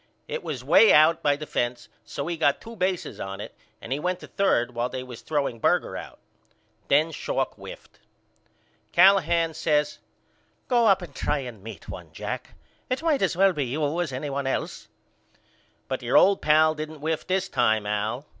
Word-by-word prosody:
It 480 Hz, -, -4 dB
was -, -, -5 dB
way 225 Hz, -, +6 dB
out 160 Hz, +2 st, +5 dB
by 145 Hz, -2 st, +2 dB
the 155 Hz, +2 st, -7 dB
fence 120 Hz, -3 st, -2 dB, 0.2 s
so 140 Hz, -, -5 dB
he 170 Hz, -, -2 dB
got 145 Hz, -3 st, +2 dB
two 230 Hz, 0 st, -11 dB
bases 185 Hz, -3 st, -2 dB
on 95 Hz, 0 st, -6 dB
it -, -, -8 dB, 0.3 s
and 125 Hz, -, -4 dB
he 140 Hz, -, -2 dB
went 180 Hz, +3 st, -2 dB
to -, -, -8 dB
third 125 Hz, -11 st, +1 dB
while 120 Hz, +1 st, -1 dB
they 130 Hz, 0 st, -5 dB
was 125 Hz, -2 st, -10 dB
throwing 140 Hz, -6 st, -2 dB
Berger -, -, +1 dB
out. -, -, -8 dB, 0.7 s
Then 155 Hz, +4 st, +3 dB
Schalk -, -, -2 dB
whiffed. -, -, -12 dB, 0.9 s
Callahan 170 Hz, -3 st, +4 dB
says 150 Hz, -1 st, 0 dB, 0.7 s
Go 240 Hz, -3 st, +3 dB
up 195 Hz, -2 st, +4 dB
and 160 Hz, -5 st, -10 dB
try 145 Hz, +1 st, -1 dB
to 125 Hz, -, -6 dB
meet 110 Hz, -3 st, -11 dB
one -, -, -9 dB
Jack. -, -, -6 dB, 0.3 s
It 255 Hz, +5 st, -2 dB
might 315 Hz, -4 st, +2 dB
as 185 Hz, -3 st, 0 dB
well 195 Hz, 0 st, +5 dB
be 145 Hz, -4 st, -1 dB
you 150 Hz, +5 st, -1 dB
as 170 Hz, -5 st, -3 dB
anybody 135 Hz, +1 st, -3 dB
else. -, -, -4 dB, 1.0 s
But 130 Hz, -1 st, -3 dB
your 120 Hz, +1 st, +2 dB
old 195 Hz, 0 st, +5 dB
pal 155 Hz, +1 st, +4 dB
didn't 155 Hz, 0 st, -7 dB
whiff 160 Hz, +1 st, -2 dB
this 190 Hz, +1 st, 0 dB
time 110 Hz, -7 st, +1 dB
Al. 105 Hz, +6 st, -2 dB
150 Hz, 185 wpm, -25 LUFS, 125-175 Hz, 1.0 s, way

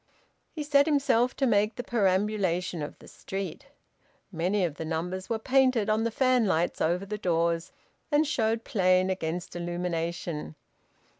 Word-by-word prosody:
He 310 Hz, -, -5 dB
set 285 Hz, 0 st, +4 dB
himself 265 Hz, -5 st, +2 dB
to 270 Hz, -, +1 dB
make 210 Hz, -2 st, +2 dB
the 245 Hz, -, -5 dB
perambulation 190 Hz, -5 st, 0 dB
of 145 Hz, -, -6 dB
the -, -, -16 dB
street. 195 Hz, -4 st, -6 dB, 0.6 s
Many 185 Hz, +4 st, 0 dB
of 165 Hz, -, -3 dB
the -, -, -4 dB
numbers 175 Hz, +4 st, -3 dB
were 230 Hz, -, 0 dB
painted 255 Hz, -2 st, +2 dB
on 220 Hz, +1 st, +1 dB
the -, -, +2 dB
fanlights 225 Hz, -9 st, +2 dB
over 175 Hz, +4 st, +1 dB
the 210 Hz, +1 st, -5 dB
doors 170 Hz, -2 st, 0 dB, 0.4 s
and 295 Hz, +1 st, +4 dB
showed 225 Hz, -6 st, 0 dB
plain 185 Hz, -1 st, +2 dB
against 175 Hz, -1 st, -4 dB
illumination. 170 Hz, -, -3 dB
195 Hz, 145 wpm, -28 LUFS, 175-230 Hz, 0.6 s, set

